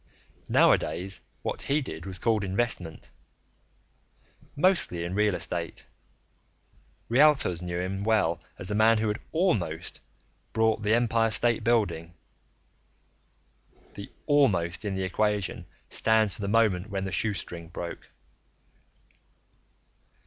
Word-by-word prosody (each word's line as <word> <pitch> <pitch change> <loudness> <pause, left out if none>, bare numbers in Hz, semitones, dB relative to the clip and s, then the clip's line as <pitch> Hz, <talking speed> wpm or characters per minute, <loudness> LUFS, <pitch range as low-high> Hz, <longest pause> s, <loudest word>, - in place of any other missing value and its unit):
Nowadays 95 +3 +2 0.2
what - - -3
he 145 +2 +1
did 85 - -6
was 95 -1 -3
called 110 -1 +1
investment 95 -4 -3 1.4
mostly 150 - +3
in 85 +1 -4
real 105 -1 +2
estate; 85 -2 -4 1.2
realtors 130 - +4
knew 90 -1 -3
him 95 +2 -3
well 105 -7 +1 0.2
as 90 - -5
the - - -1
man 110 +2 +4
who 110 0 0
had 105 - -2
almost 90 - -1 0.5
bought 110 -1 +2
the 105 +1 +2
Empire 115 -1 +2
State 115 +1 +1
Building. 100 -8 0 1.8
(The - - -9
almost 100 -11 +2
in 100 -2 -2
the 95 - -2
equation 105 +1 -1 0.2
stands 110 -3 +2
for - - -9
the 100 - -2
moment 105 -3 +2
when 95 -1 -3
the 95 - -4
shoestring 90 -5 -3
broke.) 85 +1 -7
105 Hz, 115 wpm, -27 LUFS, 90-115 Hz, 1.8 s, realtors